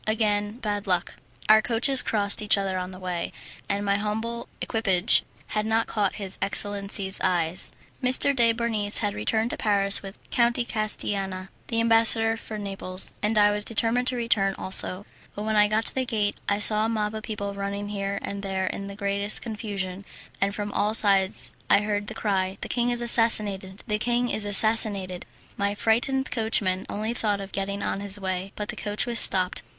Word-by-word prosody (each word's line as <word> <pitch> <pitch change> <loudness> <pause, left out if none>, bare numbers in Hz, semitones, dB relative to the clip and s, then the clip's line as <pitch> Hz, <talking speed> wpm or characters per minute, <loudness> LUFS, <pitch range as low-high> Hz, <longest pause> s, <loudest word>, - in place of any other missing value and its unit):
Again 210 -1 -1
bad 205 -4 -5
luck! 180 -2 -2 0.3
Our 220 0 +5
coaches 245 +4 +2
crossed 205 -2 -1
each 210 0 +2
other 195 -1 -3
on 180 0 -6
the 185 - -12
way, 180 -2 -5 0.4
and 200 0 -3
my 200 0 0
humble 220 +3 -5
equipage 200 -3 +2 0.3
had 215 - -2
not 225 +1 -1
caught 205 -3 -3
his 195 -2 -3
excellency's 200 -1 +1
eye. 175 -2 -1 0.5
M. 250 -1 0 0.2
de 235 -2 +2
Bernis 225 -3 +2
had 205 -2 -2
returned 220 +2 -2
to - - -6
Paris 200 -2 +3
with 195 0 -11
Count 235 -1 +1
de 240 - -2
Castillana, 195 -4 -2 0.2
the 230 - -2
ambassador 225 0 +4
from 215 -2 -9
Naples, 195 -2 +4
and 215 +1 -2
I 205 0 +3
determined 230 +3 -2
to 255 - +1
return 210 -5 -1
also; 190 +1 +3 0.3
but 205 - -6
when 220 0 -3
I 210 0 +4
got 215 +2 -2
to - - +3
the 260 - -2
gate 215 -5 -3
I 200 - 0
saw 215 +1 +3
a 225 - -1
mob 215 -2 -3
of 220 - -7
people 205 -2 -6
running 200 +1 -6
here 200 -1 -5
and 200 0 -6
there 190 -1 -4
in 195 +1 -6
the 200 - -9
greatest 200 0 -1
confusion, 200 -4 -6 0.4
and 200 +1 -1
from 205 -1 -6
all 210 +2 -1
sides 195 -3 +2 0.2
I 200 - +4
heard 205 0 -4
the - - -7
cry, 190 -2 -3
"The - - -7
king 240 0 -1
is 240 0 +5
assassinated! 205 -5 +5
The 210 -2 -3
king 245 +1 -1
is 215 - +1
assassinated!" 205 -3 +4 0.3
My 200 0 -2
frightened 265 +5 0
coachman 210 -5 -1
only 215 +3 -4
thought 210 -4 -2
of 195 0 -9
getting 200 +1 -5
on - - -3
his 200 0 -2
way, 190 0 -5
but 210 0 -7
the - - -5
coach 210 +2 -3
was 235 -1 +4
stopped. 185 -1 +5
205 Hz, 190 wpm, -24 LUFS, 195-225 Hz, 0.5 s, Our